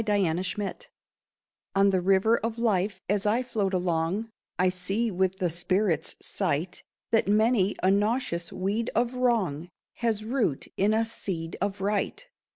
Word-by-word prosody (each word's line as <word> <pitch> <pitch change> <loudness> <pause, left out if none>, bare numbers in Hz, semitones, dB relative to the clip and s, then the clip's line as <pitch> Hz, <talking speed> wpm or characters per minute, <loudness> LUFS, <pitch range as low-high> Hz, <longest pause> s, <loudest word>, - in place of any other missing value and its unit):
INSIGHT 195 -1 -1 0.9
On 195 0 +5
the 185 -1 +2
river 195 +4 +4
of 230 0 -3
life, 200 -4 +1
as 205 +1 +1
I 230 +5 +2
float 215 -6 -1
along, 180 +4 -1 0.3
I 185 +1 +3
see 195 +5 -1
with 190 0 0
the 180 -3 0
spirit's 175 -1 0
sight 175 -1 -2 0.3
That 225 - +3
many 210 -1 +3
a 185 - +5
nauseous 205 -4 0
weed 205 +5 -1
of 240 +2 +1
wrong 210 - 0 0.3
Has 225 -3 0
root 230 - 0
in 205 +3 +2
a 225 +1 +2
seed 175 -7 -4
of 200 0 -2
right. 205 - -1
195 Hz, 145 wpm, -27 LUFS, 180-220 Hz, 0.9 s, On